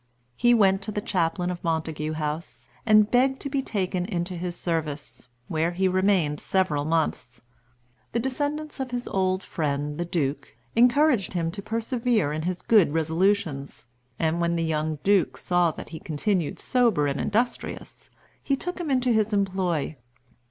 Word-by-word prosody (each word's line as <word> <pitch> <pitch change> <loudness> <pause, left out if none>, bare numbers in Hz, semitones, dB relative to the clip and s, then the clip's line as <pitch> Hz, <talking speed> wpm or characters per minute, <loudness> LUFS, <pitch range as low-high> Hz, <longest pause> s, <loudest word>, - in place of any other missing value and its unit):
He 240 - +4
went 195 -3 +4
to 215 - -4
the 210 - -2
Chaplain 175 -2 0
of 175 - -6
Montagu 160 -2 -2
House, 155 +2 -4 0.2
and 215 -1 +5
begged 265 +2 +3
to 280 - -5
be 275 -1 +1
taken 185 -6 -2
into 180 -2 -3
his 175 0 -4
service, 155 -7 -4 0.2
where 160 +1 0
he 190 +2 +1
remained 185 -5 +2
several 160 -7 0
months. 150 -6 -1 0.7
The 235 - 0
descendants 290 +4 -3
of 265 -1 -3
his 245 0 -4
old 185 0 0
friend, 145 -1 -2
the - - +1
Duke, 145 -6 -2 0.2
encouraged 250 -2 +4
him 165 -2 -1
to 200 - -7
persevere 230 - 0
in 155 - -2
his 180 +2 -3
good 200 -10 +4
resolutions; 160 -4 0 0.3
and 165 +1 0
when 170 0 +1
the 165 - 0
young 155 -1 -1
Duke 200 -3 +3
saw 175 -1 +2
that 155 - -8
he 160 - -7
continued 165 +1 -1
sober 235 - +2
and 140 0 -1
industrious, 235 +4 -2 0.3
he 275 - +1
took 360 +6 -5
him 325 - -3
into 255 -2 +2
his 215 -1 +1
employ. 185 -6 0
180 Hz, 160 wpm, -25 LUFS, 160-220 Hz, 0.7 s, and